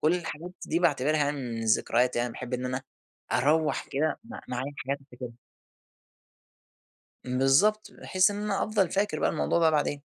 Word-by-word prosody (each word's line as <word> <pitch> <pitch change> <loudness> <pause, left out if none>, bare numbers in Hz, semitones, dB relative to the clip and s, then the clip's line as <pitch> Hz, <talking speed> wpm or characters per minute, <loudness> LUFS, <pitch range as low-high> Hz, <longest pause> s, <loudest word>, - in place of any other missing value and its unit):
كلّ 160 +3 +3
الحاجات 175 0 -5 0.2
دي 165 - +1
باعتبرها 150 -2 +2
من 125 -6 -4
الذكريات، 120 +3 +2
أنا 120 +1 +1
باحب 125 +2 -5
إن 125 0 -3
أنا 130 +1 -2 0.5
أروّح 150 0 +2
كده 155 +3 0
م 230 - -15 0.2
معايا 125 +3 -3
حاجات 140 +2 -2
أفتكرها. 125 -3 -9 1.9
بالضبط، 135 +12 +3
بحيث 185 +1 +2
إن 205 0 -4
أنا 210 -2 0
أفضل 205 -4 +1
فاكر 195 -5 0
بقى - - +2
الموضوع 165 - +1
ده 165 -1 +5
بعدين. 145 -2 0
145 Hz, 155 wpm, -28 LUFS, 125-170 Hz, 1.9 s, ده